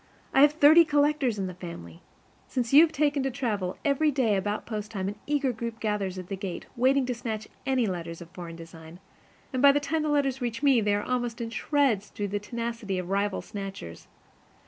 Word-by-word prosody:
I 270 - +5
have 295 +1 +6
thirty 310 +2 +7
collectors 290 -6 +1
in 195 - -2
the 185 - -5
family. 170 - -9 0.5
Since 245 -1 -2
you 290 - +10
have 330 -1 +4
taken 290 -1 +1
to 270 - 0
travel, 210 -8 -2
every 290 +2 +3
day 255 -7 +1
about 205 +2 -2
post 215 -2 -5
time 195 -4 -3
an 205 +1 -5
eager 285 -3 +1
group 230 0 -5
gathers 205 -4 -2
at 185 - -6
the 195 - -4
gate, 190 -2 -6
waiting 260 +2 +3
to 250 - -1
snatch 225 -3 -5 0.2
any 260 -3 +2
letters 170 -4 -4
of 170 -1 -12
foreign 175 -2 -8
design, 165 0 -12 0.5
and 255 - 0
by 280 0 +8
the 290 - +2
time 310 +2 -1
the 305 - -1
letters 275 -3 +1
reach 240 +1 -3
me 270 -5 +5
they 205 -1 +2
are 205 - -1
almost 245 -1 -2
in 230 -1 -4
shreds 250 -7 +1
through 205 0 -4
the 205 +1 -2
tenacity 230 -2 -4
of 180 0 -4
rival 200 0 0
snatchers. 195 - -8
230 Hz, 215 wpm, -27 LUFS, 195-275 Hz, 0.5 s, you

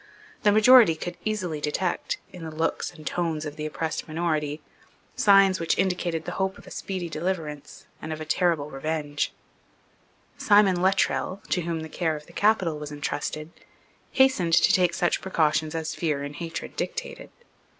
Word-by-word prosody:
The 205 - +4
majority 220 -3 +7
could 175 +2 -6
easily 185 -8 -2
detect, 170 +5 -1 0.2
in 180 - -9
the 160 - -5
looks 160 +1 -2
and 155 -3 -14
tones 160 -3 -2
of 150 -1 -6
the 155 0 -4
oppressed 155 +3 -4
minority, 155 -2 -1 0.6
signs 195 -2 +5
which 165 - 0
indicated 180 -3 -1
the - - -4
hope 190 0 -1
of - - -15
a - - -12
speedy 185 -3 -4
deliverance 155 -3 -4 0.2
and 160 - -6
of 155 - -4
a 155 - -5
terrible 155 -2 +1
revenge. 145 +1 -2 1.1
Simon 205 -4 +4
Luttrell, 190 0 +1
to 180 - +1
whom 165 -1 -3
the 160 - -6
care 160 0 -1
of 150 0 -9
the - - -17
capital 190 -7 +2
was 150 0 -7
entrusted, 150 +2 -4 0.6
hastened 260 -11 +3
to - - +5
take 180 -2 +3
such 175 - +1
precautions 160 -3 +1
as 160 -1 -3
fear 150 -4 -1
and 145 +1 -7
hatred 165 -1 -6
dictated. - - -5
165 Hz, 165 wpm, -26 LUFS, 155-185 Hz, 1.1 s, majority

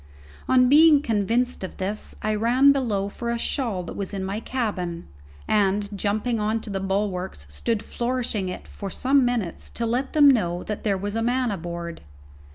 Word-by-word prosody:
On 255 -1 +5
being 295 +1 +6
convinced 230 +1 0
of 185 - -6
this, 200 +3 -2
I 215 0 +1
ran 245 +6 +4
below 225 -8 0
for 235 +3 -5
a 235 - 0
shawl 230 -6 -1
that - - -7
was 200 0 -4
in 190 - -3
my 195 +3 -3
cabin, 200 -9 -3 0.4
and, 205 0 +1
jumping 215 +4 -1
on 215 +2 0
to 215 - -7
the 195 - -2
bulwarks, 190 - -2
stood 215 - -2
flourishing 235 -6 -2
it 180 - -7
for 200 - -7
some 270 +7 +2
minutes 235 -8 -2
to 235 - -3
let 245 +4 -1
them 295 -2 +7
know 180 -10 +3
that 210 - -5
there 200 -3 +1
was 205 +2 -4
a 225 - -1
man 245 0 +1
aboard. 170 -2 -5
215 Hz, 180 wpm, -24 LUFS, 195-245 Hz, 0.4 s, them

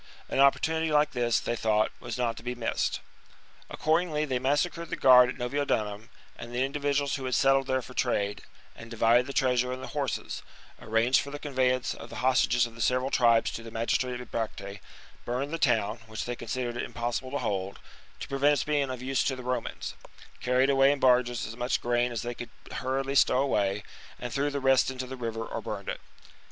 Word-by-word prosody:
An - - -1
opportunity 160 +3 +3
like 150 0 +3
this, 120 -3 +1
they 120 - -2
thought, 110 -1 +1
was 120 -1 -5
not 120 -2 0
to - - -8
be 125 +1 -4
missed. 115 -2 -1 0.7
Accordingly 155 -1 +1
they 130 -4 -1
massacred 155 +5 0
the - - -2
guard 125 -1 +7
at - - -5
Noviodunum 120 -5 -2 0.3
and 120 - -9
the 125 +2 0
individuals 140 0 0
who 135 - -7
h^d 130 - 0
settled 135 0 +3
there 130 -1 0
for 130 - -11
trade, 105 -6 0 0.3
and 115 - -11
divided 115 +2 +3
the - - -4
treasure 125 -2 +1
and 130 +1 -5
the - - -6
horses; - - -3 0.4
arranged 115 +4 +3
for 140 - -7
the 145 - -6
conveyance 130 -3 0
of - - -10
the - - -9
hostages 125 -2 +3
of 120 - -9
the 115 - -8
several 130 +3 +1
tribes 115 -2 +4
to - - -6
the 115 - -9
magistrate 120 +2 -1
at 125 - -10
Bibracte; 100 -3 -4 0.4
burned 130 +5 -3
the 165 - -2
town, 115 -4 +1
which 110 0 -5
they 120 - -3
considered 120 +1 -4
it - - -1
impossible 120 +2 -3
to 140 - -2
hold, 95 -5 -2 0.4
to - - -5
prevent 140 +2 +3
its 145 - 0
being 145 -2 0
of 130 -1 -5
use 135 0 +1
to 135 - 0
the 130 - -8
Romans; 125 +1 -3 0.5
carried 130 +2 +2
away 135 0 +5
in 145 - -1
barges 125 -2 +3
as 110 - -7
much 125 +1 0
grain 120 0 +1
as 115 -3 -3
they 120 0 -3
could 120 0 -8 0.2
hurriedly 135 +1 -2
stow 135 - +4
away; 100 -7 +1 0.3
and 120 -1 -6
threw 140 +1 +1
the 140 -1 -3
rest 135 -1 +4
into 130 -1 -4
the 130 +1 -7
river 115 -2 -4
or - - -5
burned - - -5
it. - - -4
125 Hz, 210 wpm, -28 LUFS, 120-135 Hz, 0.7 s, guard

